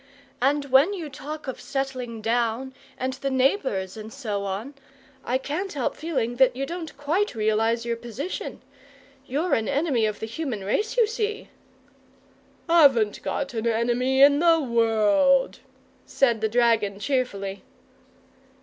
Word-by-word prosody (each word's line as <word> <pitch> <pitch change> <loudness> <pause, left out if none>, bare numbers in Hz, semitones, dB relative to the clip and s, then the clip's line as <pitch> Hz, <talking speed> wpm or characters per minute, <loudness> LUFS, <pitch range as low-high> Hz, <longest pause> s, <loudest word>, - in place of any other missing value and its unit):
And 280 +2 +2
when 290 +10 +5
you 330 -5 -6
talk 300 +2 -8
of 260 - -5
settling 255 -4 -4
down, 235 +3 0 0.2
and 260 +1 -2
the 275 +1 -3
neighbours, 260 - 0
and 220 0 -9
so 210 -7 -4
on, 200 +8 -4 0.5
I 250 - 0
can't 310 +9 -4
help 270 -5 -2
feeling 260 -7 -2
that 260 -1 +4
you 270 +1 -2
don't 335 0 -7
quite 325 - 0
realize 225 +2 +1
your 235 -1 -2
position. 240 - -6 0.6
You're 305 +8 -1
an 220 - +1
enemy 275 -7 +1
of 210 - -4
the - - -4
human 230 -3 -4
race, 420 - -1
you 475 - +6
see!" 435 0 -3 1.2
"Haven't 275 -11 +4
got 275 -2 -3
an 225 0 -2
enemy 240 +4 +2
in 285 0 +6
the 335 0 +5
world," 235 +1 +2 0.5
said 235 -5 +2
the 220 - +1
dragon, 225 -4 +2
cheerfully. 205 -7 -2
255 Hz, 140 wpm, -25 LUFS, 225-290 Hz, 1.2 s, you